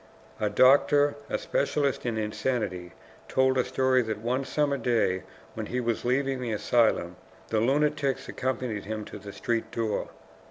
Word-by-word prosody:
A 105 -1 +1
doctor, 145 +5 +5 0.2
a - - 0
specialist 150 - 0
in 115 -2 -1
insanity, 105 -5 -2 0.3
told 130 0 +2
a 130 - +3
story 130 -1 +2
that 110 -2 -3
one 125 +5 -1
summer 140 0 0
day 115 -7 +1 0.3
when - - -5
he 125 - -2
was 115 -2 -1
leaving 130 +1 0
the 120 -2 -2
asylum, 105 -5 +1 0.3
the 110 - +1
lunatics 140 +2 +1
accompanied 125 -5 -3
him 110 0 -4
to - - -9
the 100 0 -9
street 115 +1 -2
door. 110 -2 -2
125 Hz, 155 wpm, -27 LUFS, 110-135 Hz, 0.3 s, doctor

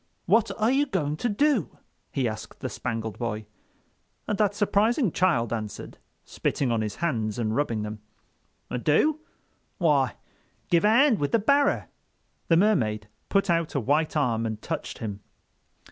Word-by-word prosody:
"What 215 +5 +3
are 220 +3 +3
you 285 +2 +2
going 150 - -1
to 240 - -1
do?" 250 - +1 0.3
he 135 -4 0
asked 110 +1 -7
the 130 - -3
Spangled 115 -4 -4
Boy. 110 -3 -3 0.8
And 210 - 0
that 205 -2 +2
surprising 210 - +2
child 150 - +1
answered, 110 -2 -6 0.3
spitting 130 -4 -1
on 115 -1 +1
his 105 -1 -3
hands 110 -9 -1
and 110 -2 -1
rubbing 115 -7 0
them: 105 0 -6 0.8
"Do? 295 - +3 0.6
Why, 140 - +2 0.6
give 170 +2 +4
a - - +6
'and 235 +1 +5
with 145 - -1
the - - +6
barrer." 280 +6 +2 0.6
The 165 - +4
Mermaid 110 - +1 0.2
put 195 0 +2
out 170 -3 0
a - - +2
white 150 +6 +1
arm 115 -5 +1
and 110 -1 -4
touched - - -5
him. 105 -3 -5
150 Hz, 155 wpm, -26 LUFS, -, 0.8 s, a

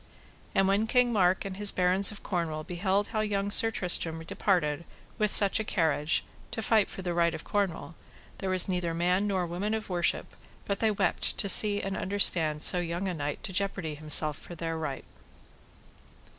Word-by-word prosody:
And 195 0 +2
when 200 +3 +1
King 245 0 +2
Mark 185 -3 +1
and 190 -1 -6
his 205 0 +2
barons 185 +3 +3
of 210 - -12
Cornwall 165 -4 -3
beheld 190 +4 -2
how 220 - -3
young 205 -1 -2
Sir 225 - +6
Tristram 170 -5 +1
departed 165 -3 -1 0.4
with 210 -1 +1
such 200 +1 +4
a - - -2
carriage 160 -6 0 0.3
to 225 -2 -6
fight 215 -1 +2
for 190 - -8
the 175 -1 -3
right 170 -1 +1
of - - -8
Cornwall, 195 -5 -3 0.5
there 190 - -4
was 185 -1 +2
neither 180 -3 -2
man 180 +4 0
nor 190 -3 -1
woman 190 +6 -3
of 220 -2 -6
worship 175 -1 -1 0.3
but 200 -1 -3
they 220 - +1
wept 200 -3 -1
to - - -1
see 205 0 +5
and 195 0 -4
understand 165 -6 +2
so 180 - +4
young 175 +2 -4
a 185 - -3
knight 145 -2 -5
to 190 - -7
jeopardy 195 -4 -2
himself 150 0 +3
for 175 - -11
their 165 0 -4
right. 155 -4 -6
185 Hz, 185 wpm, -28 LUFS, 170-205 Hz, 0.5 s, Sir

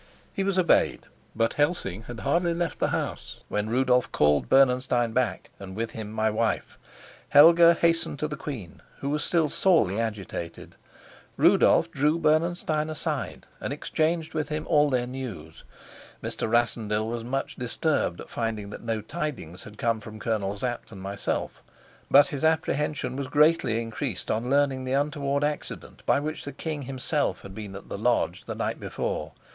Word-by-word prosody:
He 195 - -1
was 195 -1 0
obeyed; 180 -3 +3 0.3
but 115 0 +1
Helsing 145 - -1
had 120 -1 -7
hardly 170 +4 +1
left 170 -3 -2
the - - +2
house - - -4
when 105 +1 -1
Rudolf 125 +1 +2
called 75 -4 +2
Bernenstein 125 -3 +3
back, 120 -6 -1
and 95 -1 -8
with 115 +1 -3
him 110 -1 -6
my 110 0 0
wife. 110 +1 -1 0.5
Helga 170 +3 +8
hastened 165 -3 +2
to 150 - -1
the 150 - -5
queen, 115 - -7 0.2
who 140 - -2
was 150 0 0
still 165 -3 +2
sorely 145 - +2
agitated; 100 -7 -5 0.6
Rudolf - - +5
drew 150 +4 +2
Bernenstein 155 -1 +1
aside, 155 - -3
and - - -4
exchanged 160 0 -1
with 155 - -2
him 155 0 -3
all 150 0 +4
their 125 -2 +1
news. 120 -12 -7 0.6
Mr. - - -3
Rassendyll 110 -2 +1
was 115 0 -3
much 135 +3 -3
disturbed 125 - -1
at - - -8
finding 110 -3 -3
that - - -8
no 115 -2 -2
tidings 135 - -5
had 105 0 -12
come 115 0 0
from 110 0 -10
Colonel 105 -2 -1
Sapt 120 +2 -4
and 100 - -9
myself, 100 +1 -3 0.5
but 145 +1 +7
his 145 +1 -4
apprehension 150 -4 0
was 140 -1 -3
greatly 150 -5 +3
increased 115 -2 -4
on 115 +3 -1
learning 140 -1 +2
the 130 0 -2
untoward 140 0 0
accident 150 0 -4
by - - +4
which 155 +2 -4
the 145 - -6
king 150 +2 -4
himself 135 +3 -2
had 100 - -10
been 105 -2 -7
at 100 - -9
the - - -5
lodge 120 +2 +1
the - - -5
night - - -2
before. - - -3
130 Hz, 165 wpm, -26 LUFS, 110-150 Hz, 0.6 s, Helga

